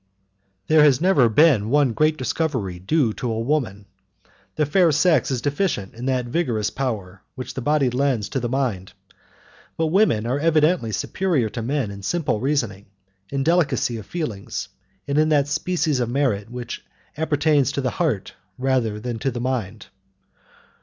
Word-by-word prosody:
There 155 +5 +5
has 145 -4 +5
never 160 -9 +4
been 115 -4 +4
one 140 -2 +3
great 155 +4 +2
discovery 130 - -2
due 115 - +1
to 125 0 -3
a 110 - -2
woman. 115 -6 -1 0.7
The 150 - +1
fair 175 +2 +3
sex 160 +3 +3
is 130 -3 -2
deficient 145 - -1
in 120 +3 -6
that 130 -2 0
vigorous 120 -6 -1
power 100 -8 -4
which 130 0 -6
the 130 - -4
body 140 -1 +2
lends 125 -5 0
to 135 - -2
the 120 -1 -3
mind, 120 -8 -2 0.8
but 160 - +1
women 185 - +3
are 130 +4 0
evidently 155 -5 +2
superior 155 - 0
to 115 - -5
men 125 -2 -1
in 100 0 -9
simple 140 - -1
reasoning, 115 -8 -1 0.4
in 135 -1 -1
delicacy 160 -7 +1
of 110 - -9
feelings, 135 - -4 0.4
and 140 +1 +1
in 155 0 +3
that 145 -2 +3
species 155 -2 0
of 120 -2 -1
merit 120 -6 0
which 125 0 -7 0.3
appertains 150 -3 +2
to 140 - -1
the 130 - -1
heart 150 - -1 0.2
rather 125 -5 0
than 120 0 -4
to 135 - 0
the 120 -2 -5
mind. 115 -5 -3
130 Hz, 165 wpm, -22 LUFS, 115-150 Hz, 0.8 s, There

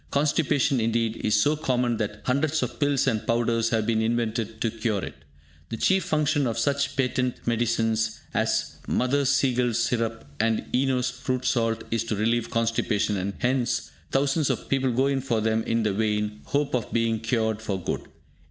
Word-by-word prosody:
Constipation, 140 -2 +2
indeed, 115 0 0
is 105 0 +2
so 145 +8 +3
common 125 -6 0
that 105 0 -3
hundreds 145 +4 +1
of - - -5
pills 145 -2 +2
and 110 -2 0
powders 115 -1 +1
have 110 -2 +1
been 110 -1 +1
invented 115 -1 -1
to 115 - +1
cure 110 -3 -1
it. - - -8 0.6
The 115 - -4
chief 190 - +2
function 150 -2 +1
of 115 - -2
such 140 0 0
patent 125 -1 0
medicines 115 -1 0
as - - 0
Mother 140 +3 +1
Siegel's 125 -3 +2
Syrup 115 -1 -1
and 110 0 +1
Eno's 130 -1 +1
Fruit 130 0 -3
salt 115 -3 +1
is 115 0 +1
to 115 - -1
relieve 115 +3 0
constipation, 115 -2 0
and 100 +1 -2
hence 125 -1 0 0.2
thousands 140 +2 +1
of - - -2
people 135 -1 +1
go 130 +3 +2
in 140 -1 +1
for 120 -4 0
them 110 +1 +1
in 115 0 +1
the 105 -2 +1
vain 105 0 -1
hope 145 0 -1
of 125 -3 -1
being 115 -1 +1
cured 110 -1 0
for 100 -4 -2
good. 90 - -3
115 Hz, 175 wpm, -26 LUFS, 110-130 Hz, 0.6 s, so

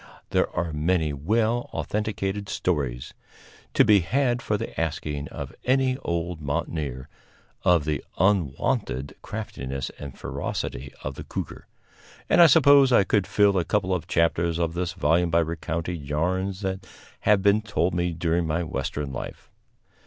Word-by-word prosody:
There - - +2
are 85 -2 -1
many 80 0 +1
well 110 - 0
authenticated 105 -1 -2
stories, 70 -12 -2 0.6
to - - +6
be 105 -2 +6
had 125 +7 +1
for 105 - 0
the - - -5
asking 75 -2 -3
of - - -7
any 130 0 +2
old 85 - -3
mountaineer, 70 -2 -3 0.5
of 85 -4 +3
the 75 -3 -1
unwonted 85 - 0
craftiness 70 - -5
and 70 -2 -8
ferocity 65 +2 -4
of 65 - -3
the - - -8
cougar, - - -6 0.6
and - - +5
I 170 - +10
suppose 140 -3 +6
I 115 - +6
could 100 -1 +1
fill 100 -2 +3
a - - +1
couple 95 0 0
of 85 -2 -2
chapters 85 0 +1
of 85 -1 0
this 90 +1 -2
volume 85 0 +2
by 85 +1 +3
recounting 85 0 -3
yarns 90 +7 -1
that 95 -1 -3 0.3
have 105 -2 +3
been 100 +2 +4
told 105 -4 0
me 90 0 0
during 85 0 0
my 80 +3 0
Western 70 -2 -3
life. - - -7
85 Hz, 150 wpm, -25 LUFS, 75-105 Hz, 0.6 s, I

